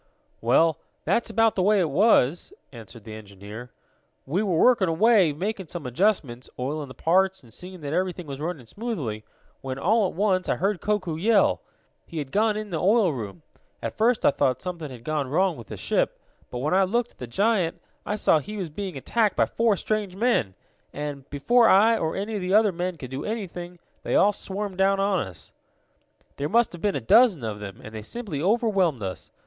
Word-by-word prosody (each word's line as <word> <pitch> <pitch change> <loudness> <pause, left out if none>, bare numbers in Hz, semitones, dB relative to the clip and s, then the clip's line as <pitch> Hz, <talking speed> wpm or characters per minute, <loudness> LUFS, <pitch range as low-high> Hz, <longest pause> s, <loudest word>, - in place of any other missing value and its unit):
"Well, 160 +7 +3 0.3
that's 235 - +1
about 225 0 +3
the 190 - -1
way 205 +2 +4
it 165 -5 +1
was," 175 - +3 0.2
answered 115 -2 -12
the 110 0 -9
engineer. 105 +3 -10 0.6
"We 165 +9 0
were 190 -6 0
working 230 -2 +4
away, 195 0 +4
making 190 +4 -4
some 165 -2 -7
adjustments, 130 - 0
oiling 145 +3 -3
the 130 - -12
parts 190 +5 +1
and 115 -3 -15
seeing 180 +3 -9
that 145 0 -4
everything 180 0 -1
was 140 -1 -7
running 160 -6 -4
smoothly, 140 - -4 0.4
when, 130 -1 -5
all 210 +7 +2
at - - -8
once, 185 -1 +1
I - - +2
heard 195 0 -1
Koku 185 -7 -1
yell. 210 +4 +3 0.5
He 165 - -8
had 140 -3 -4
gone 215 +1 +2
in 215 -2 -6
the 160 - -2
oil 200 -3 +3
room. 100 - -7 0.4
At - - -5
first 230 +1 +2
I - - +6
thought 130 -2 +1
something 170 -3 -5
had 125 -3 -11
gone 150 -1 -1
wrong 180 +4 +2
with 115 - -11
the - - -7
ship, - - -1 0.3
but, 125 - -6
when 145 +7 -1
I 190 +1 +5
looked 235 +5 0
at - - -29
the 125 - -6
giant, 190 - +1 0.2
I 210 - -2
saw 165 -6 +3
he 210 +8 -7
was 180 -6 -4
being 185 -1 -5
attacked 215 - +1
by - - +3
four 230 -2 +1
strange 210 -3 -2
men. 200 - +1 0.4
And, 145 -2 -6
before 230 - +3
I, 220 +4 +6
or 160 -7 -2
any 205 +3 -3
of 205 - -2
the 185 +2 +1
other 215 -1 +5
men, 180 0 -3
could 130 -4 -9
do 135 +2 -4
anything, 180 -5 -5 0.2
they - - -2
all 205 +1 +5
swarmed 195 -1 -5
down 195 0 +3
on 195 -1 +2
us. 90 -6 -13 0.9
"There 145 +1 -2
must 235 +2 +3
have 175 - -9
been 205 -1 0
a 135 - -2
dozen 190 - +5
of 105 -2 -4
them, 100 -2 -8
and 110 - -10
they 110 - -6
simply 180 - -5
overwhelmed 195 - +1
us. 95 -1 -6
180 Hz, 205 wpm, -25 LUFS, 140-210 Hz, 0.9 s, I